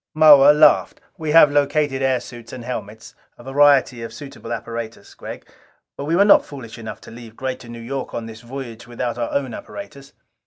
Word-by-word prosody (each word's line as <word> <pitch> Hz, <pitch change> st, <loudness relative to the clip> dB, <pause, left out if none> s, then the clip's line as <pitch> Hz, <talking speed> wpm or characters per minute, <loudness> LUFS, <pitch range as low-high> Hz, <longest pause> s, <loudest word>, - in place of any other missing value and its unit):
Moa 145 Hz, -2 st, +8 dB
laughed. 150 Hz, -, +4 dB, 0.2 s
"We 160 Hz, -4 st, -5 dB
have 150 Hz, -2 st, +7 dB
located 145 Hz, -1 st, +1 dB
air 130 Hz, -1 st, +1 dB
suits 120 Hz, -2 st, -12 dB
and 125 Hz, -2 st, -8 dB
helmets 110 Hz, -3 st, -7 dB, 0.2 s
a -, -, -14 dB
variety 135 Hz, -2 st, +3 dB
of 115 Hz, -, -7 dB
suitable 135 Hz, -5 st, -10 dB
apparatus, 115 Hz, -1 st, -6 dB
Gregg. -, -, -10 dB, 0.5 s
But 140 Hz, -, -6 dB
we 165 Hz, +3 st, 0 dB
were 200 Hz, +3 st, +5 dB
not 205 Hz, -, +6 dB
foolish 120 Hz, -5 st, -10 dB
enough 110 Hz, -, -8 dB
to -, -, -13 dB
leave 115 Hz, -1 st, -12 dB
Greater 130 Hz, -2 st, -5 dB
New 120 Hz, 0 st, -8 dB
York 130 Hz, +3 st, -5 dB
on 115 Hz, -, -4 dB
this 115 Hz, 0 st, -10 dB
voyage 120 Hz, -2 st, -9 dB
without 120 Hz, 0 st, -4 dB
our 120 Hz, -, -2 dB
own 135 Hz, -4 st, -2 dB
apparatus. 140 Hz, -, -10 dB
130 Hz, 190 wpm, -21 LUFS, 115-140 Hz, 0.5 s, Moa